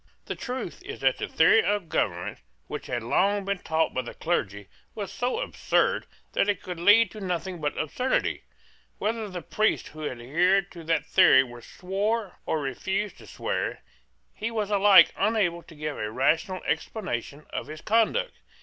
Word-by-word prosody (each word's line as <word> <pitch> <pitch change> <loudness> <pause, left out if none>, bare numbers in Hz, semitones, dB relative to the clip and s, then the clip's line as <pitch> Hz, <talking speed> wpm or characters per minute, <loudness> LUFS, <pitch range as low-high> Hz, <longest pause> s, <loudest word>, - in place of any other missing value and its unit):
The - - -3
truth 250 -7 -5
is - - -8
that 135 -1 +2
the - - -2
theory 195 +8 +5
of 205 -4 0
government 90 - -1 0.3
which - - -6
had 120 -2 -2
long 200 - +2
been 200 -1 -1
taught 160 -2 0
by 130 - 0
the 120 - -9
clergy 100 - -2 0.3
was 200 -3 -5
so 250 - -1
absurd - - 0 0.3
that 200 - +2
it 200 -3 -1
could 180 -2 -6
lead 205 +4 +6
to 215 - -9
nothing 180 -1 -3
but 150 -1 -2
absurdity. 250 - 0 0.6
Whether 220 0 -2
the 180 -3 -6
priest 215 +7 0
who 155 -1 -5
adhered 175 +11 +1
to 170 -2 -10
that 165 0 +1
theory 130 0 +6 0.2
swore 200 - -2
or 155 - 0
refused 190 - -3
to - - -14
swear, - - -3 0.5
he 225 - -3
was 215 -3 -2
alike 200 -1 +7
unable 195 -5 +1
to 165 - -15
give 150 0 -4
a 105 - -2
rational 160 - +1
explanation 150 - -3
of - - -4
his 155 +1 -8
conduct. 230 - +2
180 Hz, 165 wpm, -27 LUFS, 155-210 Hz, 0.6 s, alike